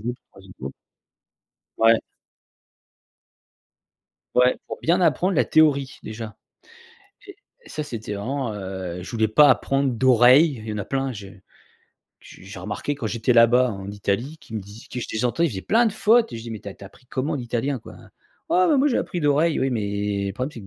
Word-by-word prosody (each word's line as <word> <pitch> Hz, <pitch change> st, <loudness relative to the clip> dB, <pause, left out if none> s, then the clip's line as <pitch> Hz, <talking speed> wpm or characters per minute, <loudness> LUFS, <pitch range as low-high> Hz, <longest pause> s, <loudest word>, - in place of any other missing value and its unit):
groupe, 120 Hz, +3 st, -4 dB
le -, -, -56 dB
3e 95 Hz, -1 st, -15 dB
groupe. 65 Hz, +1 st, -5 dB, 1.1 s
Ouais. 115 Hz, 0 st, +5 dB, 2.3 s
Ouais, 125 Hz, 0 st, +4 dB
pour -, -, -6 dB
bien 175 Hz, +3 st, +2 dB
apprendre 180 Hz, +3 st, +2 dB
la 125 Hz, -, +4 dB
théorie, 140 Hz, -3 st, +2 dB
déjà. 110 Hz, 0 st, -7 dB, 0.9 s
Et 395 Hz, -, -12 dB, 0.3 s
et -, -, -15 dB
ça, 150 Hz, -, -4 dB
c'était 110 Hz, -7 st, -6 dB
vraiment, 125 Hz, +4 st, -3 dB
heu, 95 Hz, -3 st, -6 dB
je -, -, -8 dB
voulais 110 Hz, -2 st, +1 dB
pas 145 Hz, +7 st, +6 dB
apprendre 135 Hz, -1 st, +2 dB
d'oreille. 130 Hz, +5 st, +5 dB
Il -, -, -8 dB
y -, -, -3 dB
en 105 Hz, -, -4 dB
a 100 Hz, -, -3 dB
plein 135 Hz, +3 st, -2 dB
je 100 Hz, -4 st, -9 dB, 0.9 s
j -, -, -15 dB
j'ai 100 Hz, +1 st, -9 dB
remarqué 105 Hz, +7 st, -4 dB
quand 125 Hz, -6 st, -4 dB
j'étais 115 Hz, +2 st, 0 dB
là-bas, 120 Hz, +1 st, +5 dB
en 95 Hz, -1 st, -7 dB
Italie, 100 Hz, +8 st, -2 dB
qui 135 Hz, -8 st, -12 dB
me 110 Hz, -, -2 dB
dis 100 Hz, +5 st, -13 dB
que 125 Hz, -, -5 dB
je -, -, -4 dB
les 110 Hz, +2 st, -2 dB
entends, 125 Hz, +7 st, +1 dB
ils 170 Hz, -, +3 dB
faisaient 95 Hz, -5 st, -5 dB
plein 235 Hz, +2 st, +3 dB
de 215 Hz, -, 0 dB
fautes! 225 Hz, -, +3 dB
Je 115 Hz, -, -6 dB
dis: 115 Hz, -, -8 dB
«Mais 110 Hz, -, -5 dB
tu -, -, -8 dB
as 100 Hz, -, -9 dB
tu -, -, -19 dB
as -, -, -8 dB
appris 125 Hz, -, -20 dB
comment 145 Hz, +6 st, -2 dB
l'italien 125 Hz, +1 st, -2 dB
quoi?» 110 Hz, -, -13 dB, 0.6 s
«Ouais, 365 Hz, +1 st, +4 dB
bah 305 Hz, -, +4 dB
moi, 275 Hz, +2 st, +3 dB
j'ai 265 Hz, -, +2 dB
appris 175 Hz, -, -3 dB
d'oreille». 150 Hz, +2 st, +2 dB
Oui, 135 Hz, 0 st, +1 dB
mais, 100 Hz, -2 st, -2 dB
le 100 Hz, -, -3 dB
problème, 130 Hz, +5 st, -3 dB
c'est 120 Hz, -, -9 dB
que 100 Hz, -, -12 dB
120 Hz, 210 wpm, -23 LUFS, 105-145 Hz, 2.3 s, pas